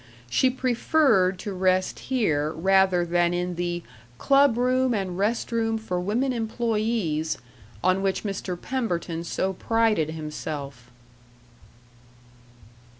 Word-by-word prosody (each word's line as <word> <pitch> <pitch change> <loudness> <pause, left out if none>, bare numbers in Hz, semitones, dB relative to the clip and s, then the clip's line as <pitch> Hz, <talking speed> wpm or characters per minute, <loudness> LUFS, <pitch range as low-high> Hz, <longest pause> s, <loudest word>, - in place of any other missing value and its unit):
She 260 - +4
preferred 250 - +2
to 205 - -4
rest 185 0 +1
here 155 - +1
rather 190 +1 +3
than 175 0 +1
in 180 0 -2
the 175 0 -3 0.3
"club 275 - +4
room 255 0 +2
and 190 -3 -2
rest 210 +6 -1
room 225 -1 0
for 180 -5 -3
women 240 +8 0
employees," 220 -8 -1 0.5
on 185 +1 +3
which 195 -1 -1
Mr. 195 -3 -4
Pemberton 175 -10 -3
so 190 +2 -2
prided 220 -5 +1
himself. 150 -5 -6
190 Hz, 110 wpm, -25 LUFS, 175-230 Hz, 0.5 s, She